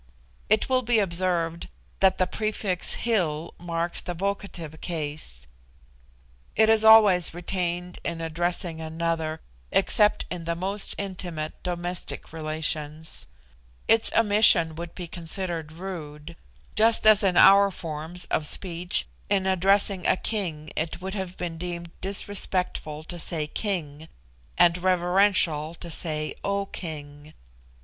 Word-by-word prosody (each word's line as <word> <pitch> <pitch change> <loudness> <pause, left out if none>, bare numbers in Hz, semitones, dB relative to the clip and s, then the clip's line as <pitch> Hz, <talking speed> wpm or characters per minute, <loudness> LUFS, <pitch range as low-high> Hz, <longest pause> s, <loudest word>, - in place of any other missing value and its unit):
It 215 +1 +3
will 255 -1 +2
be 240 -1 +1
observed 170 -3 0 0.3
that 190 -1 +4
the 185 - +2
prefix 205 -2 -1
Hil 170 -9 -1
marks 170 0 -1
the 175 - -5
vocative 180 -4 -4
case. 145 - -5 1.1
It 220 +1 +4
is 220 -1 +6
always 210 -7 +6
retained 180 0 -3
in 170 -1 -3
addressing 165 +1 -1
another, 160 0 -2 0.3
except 210 +2 +3
in 175 -2 -5
the 170 0 -1
most 195 +4 -4
intimate 175 -5 -5
domestic 175 -2 -5
relations; 155 0 -2 0.6
its 225 0 +5
omission 205 -7 +5
would 170 +1 -8
be 180 - -6
considered 170 -1 -3
rude: 165 -3 -8 0.4
just 225 +1 +3
as 215 -1 +8
in 185 -2 +2
our 200 +1 +8
of 195 - -8
forms 165 +2 -5
of 150 - 0
speech 175 - +1 0.2
in 195 -2 +1
addressing 190 0 +2
a - - +3
king 165 -9 -3
it 160 +2 -3
would 190 +1 -5
have 190 -3 -5
been 170 -2 -5
deemed 170 -1 -5
disrespectful 185 -5 -1
to 175 +2 -8
say 160 -1 -1
"King," 160 -4 -4 0.5
and 175 0 +4
reverential 180 -3 +2
to 170 0 -9
say 155 -1 -1
"O 200 0 -1
King." 150 -4 -8
175 Hz, 125 wpm, -25 LUFS, 160-195 Hz, 1.1 s, as